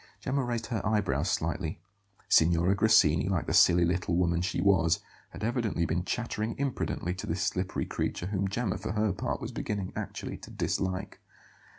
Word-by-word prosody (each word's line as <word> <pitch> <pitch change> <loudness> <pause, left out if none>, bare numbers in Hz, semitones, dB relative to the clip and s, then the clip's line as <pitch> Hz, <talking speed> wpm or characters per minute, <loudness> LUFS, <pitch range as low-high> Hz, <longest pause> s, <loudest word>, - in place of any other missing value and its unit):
Gemma 135 +1 -1
raised 120 -2 -2
her 110 - -1
eyebrows 95 -7 +1
slightly. 80 -1 -2 0.5
Signora 85 +3 +4
Grassini, 100 -5 +4
like 90 -5 0
the - - -2
silly 85 0 +6
little 85 0 0
woman 85 -1 +2
she 90 - -1
was, 90 -4 +3 0.3
had - - -9
evidently 110 -7 0
been 85 +3 -1
chattering 110 0 -2
imprudently 130 -9 -2
to 95 - -7
this 90 +3 -1
slippery 90 +2 -1
creature, - - -3
whom 100 0 -1
Gemma, 105 0 -2
for - - -4
her 105 -2 +1
part, 90 - -3
was - - -5
beginning 100 -3 -3
actually - - -5
to - - -12
dislike. 95 -1 -2
95 Hz, 170 wpm, -29 LUFS, 85-110 Hz, 0.5 s, silly